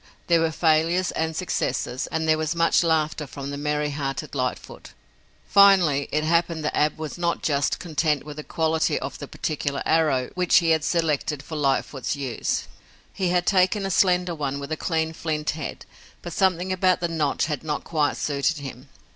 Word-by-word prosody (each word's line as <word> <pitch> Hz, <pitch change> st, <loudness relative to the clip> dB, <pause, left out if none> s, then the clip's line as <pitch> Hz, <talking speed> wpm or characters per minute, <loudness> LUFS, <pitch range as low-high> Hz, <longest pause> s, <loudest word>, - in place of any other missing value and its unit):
There 170 Hz, -1 st, +3 dB
were 165 Hz, -, +2 dB
failures 165 Hz, +3 st, +2 dB
and 160 Hz, 0 st, -2 dB
successes, 130 Hz, -7 st, -2 dB
and 160 Hz, 0 st, -2 dB
there 155 Hz, 0 st, +3 dB
was 155 Hz, +1 st, -1 dB
much 165 Hz, +1 st, +3 dB
laughter 155 Hz, -2 st, 0 dB
from 140 Hz, +1 st, -7 dB
the -, -, -4 dB
merry 150 Hz, 0 st, -1 dB
hearted 135 Hz, -2 st, -4 dB
Lightfoot. 125 Hz, -2 st, -4 dB, 0.5 s
Finally, 185 Hz, -8 st, +5 dB
it 155 Hz, +1 st, 0 dB
happened 165 Hz, -1 st, +1 dB
that -, -, -1 dB
Ab 150 Hz, 0 st, +1 dB
was 155 Hz, +2 st, -6 dB
not 170 Hz, -1 st, -1 dB
just 145 Hz, -2 st, +1 dB
content 155 Hz, -3 st, 0 dB
with 150 Hz, 0 st, -9 dB
the 150 Hz, -, -5 dB
quality 160 Hz, 0 st, 0 dB
of -, -, -6 dB
the -, -, -7 dB
particular 145 Hz, -2 st, -3 dB
arrow 150 Hz, -6 st, +2 dB
which 180 Hz, -2 st, +3 dB
he 165 Hz, -2 st, +3 dB
had 160 Hz, -2 st, +2 dB
selected 155 Hz, -4 st, 0 dB
for 160 Hz, -, -7 dB
Lightfoot's 135 Hz, -2 st, -1 dB
use. 135 Hz, -5 st, -2 dB, 0.5 s
He 185 Hz, -2 st, -1 dB
had 180 Hz, 0 st, +1 dB
taken 195 Hz, +1 st, +2 dB
a 195 Hz, -, -2 dB
slender 180 Hz, -1 st, +2 dB
one 140 Hz, -3 st, -3 dB
with 140 Hz, +2 st, -7 dB
a -, -, +1 dB
clean 160 Hz, -1 st, -1 dB
flint 155 Hz, -2 st, -2 dB
head, 150 Hz, -2 st, -6 dB, 0.4 s
but 175 Hz, -, -6 dB
something 185 Hz, -1 st, +1 dB
about 185 Hz, 0 st, +2 dB
the 175 Hz, -, 0 dB
notch 155 Hz, -4 st, 0 dB
had 150 Hz, 0 st, -3 dB
not 150 Hz, -2 st, -3 dB
quite 150 Hz, -3 st, 0 dB
suited 145 Hz, +2 st, 0 dB
him. 135 Hz, -1 st, -9 dB
155 Hz, 185 wpm, -24 LUFS, 145-170 Hz, 0.5 s, Finally